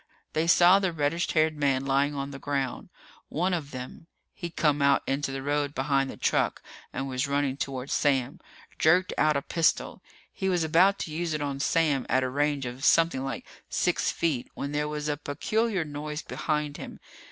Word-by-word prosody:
They 160 +2 +1
saw 180 +2 +6
the 190 -2 0
reddish 165 +2 -1
haired 155 -1 +3
man 135 -2 +1
lying 140 +2 +1
on 140 0 -4
the 135 - -8
ground. 135 -3 -3 0.4
One 180 +4 0
of 155 -5 -3
them 130 +5 -8 0.3
he'd 175 -3 -7
come 150 -2 +2
out 140 0 +4
into 135 0 -1
the 135 0 -5
road 145 0 -1
behind 135 0 +1
the - - -8
truck - - 0 0.3
and 135 - -3
was 130 +1 -1
running 140 -1 0
toward 135 -1 -4
Sam 135 -2 +1 0.4
jerked 180 +4 +4
out 155 -1 +3
a 140 - -3
pistol. 165 -2 0 0.3
He 190 -2 -1
was 175 -3 +1
about 180 +5 +4
to 160 - -4
use 165 +1 -2
it 150 - -3
on 140 -1 -3
Sam 150 -3 +1
at 130 +2 +3
a 130 - -1
range 145 0 0
of 125 +2 -6
something 165 -4 +4
like 135 -3 -4 0.2
six - - +1
feet 150 -8 -1
when 140 - -4
there 150 0 -1
was 150 0 -4
a 145 -1 -1
peculiar 190 +6 -1
noise 150 +1 -5
behind 150 -2 -2
him. - - -9
145 Hz, 190 wpm, -27 LUFS, 135-160 Hz, 0.4 s, saw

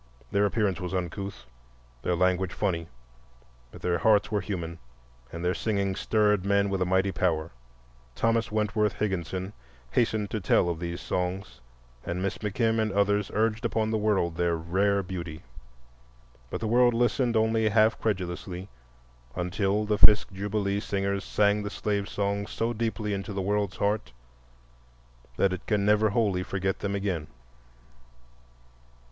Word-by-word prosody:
Their 100 0 +3
appearance 100 -3 0
was 90 +1 -3
uncouth, 90 -5 -4 0.6
their 90 - 0
language 90 +1 +1
funny, 85 -5 -1 0.8
but - - -13
their 85 -1 +1
hearts 105 +4 +3
were 105 -1 +1
human 85 -4 -5 0.5
and 85 +1 -5
their 90 - +2
singing 100 -3 -1
stirred 105 -1 +2
men 100 0 +2
with 95 -1 -1
a 90 - +2
mighty 95 +1 +2
power. 80 -4 0 0.6
Thomas 115 -1 +1
Wentworth 105 -1 +1
Higginson 95 -1 -3 0.4
hastened 110 - +1
to 110 - -1
tell 90 -1 +3
of 85 -2 -3
these 85 0 -4
songs, 90 -2 -3 0.4
and 85 +1 -3
Miss 95 +1 -2
McKim 110 +2 0
and 110 -1 0
others 100 +1 +2
urged 110 +1 +1
upon 110 -1 0
the 110 - +1
world 95 -6 +1
their 85 -1 +1
rare 100 +5 +1
beauty. 85 -4 -6 1.1
But - - -4
the 110 - -1
world 120 +1 +4
listened 120 0 +2
only 110 0 +2
half 110 +1 +3
credulously 90 -2 -3 0.7
until 95 +4 0
the 105 0 0
Fisk 105 0 +6
Jubilee 100 +1 -1
Singers 100 -1 -1
sang 105 0 +2
the 105 - -3
slave 100 -1 -2
songs 100 0 -1
so 115 +1 -1
deeply 110 -2 -2
into 100 +2 -4
the 100 - -3
world's 100 -1 0
heart 105 - -1 1.2
that 95 -1 +3
it 95 - -5
can 105 -2 +1
never 105 +1 +4
wholly 100 -4 +1
forget 95 +1 -2
them 100 0 -2
again. 95 -6 -2
100 Hz, 150 wpm, -27 LUFS, 90-105 Hz, 1.2 s, Fisk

